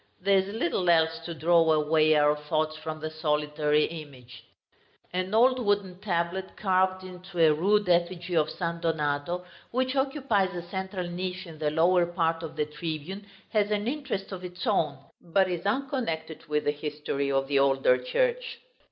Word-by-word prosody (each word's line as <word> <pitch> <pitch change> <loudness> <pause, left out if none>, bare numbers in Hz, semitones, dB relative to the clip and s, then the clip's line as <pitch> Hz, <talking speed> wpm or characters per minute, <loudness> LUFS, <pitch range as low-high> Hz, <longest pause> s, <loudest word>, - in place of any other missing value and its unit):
There 195 +1 +4
is 190 - -2
little 180 -3 -1
else 165 -1 +3
to 170 - -5
draw 165 0 +4
away 155 0 +3
our 150 0 +4
thoughts 155 +1 -1
from 155 0 -6
the 155 0 -5
solitary 150 -1 +1
image. 140 -7 -8 0.7
An 185 +1 -2
old 250 +2 +4
wooden 200 -3 0
tablet, 185 -1 -2
carved 185 -1 +1
into 185 0 -10
a 160 -2 +6
rude 205 +6 +2
effigy 175 0 +1
of 155 -1 +3
San 170 -1 -3
Donato, 160 +2 -1 0.2
which 255 +2 -1
occupies 265 -8 +1
the 175 -1 -5
central 190 0 -4
niche 180 +1 -4
in 160 -3 -11
the 150 -1 +1
lower 170 +3 +3
part 165 -2 0
of 160 -1 -7
the 150 -1 0
tribune, 160 +6 -6 0.2
has 210 -1 +1
an 210 +1 -1
interest 250 -9 -3
of 185 -1 -6
its 180 0 -6
own, 140 -4 +1 0.2
but 190 +3 +2
is 180 +1 -3
unconnected 215 - -2
with 150 0 0
the 145 - +2
history 145 -2 -3
of 135 0 +1
the 140 0 +2
older 135 -2 +3
church. 485 - 0
170 Hz, 170 wpm, -27 LUFS, 155-190 Hz, 0.7 s, a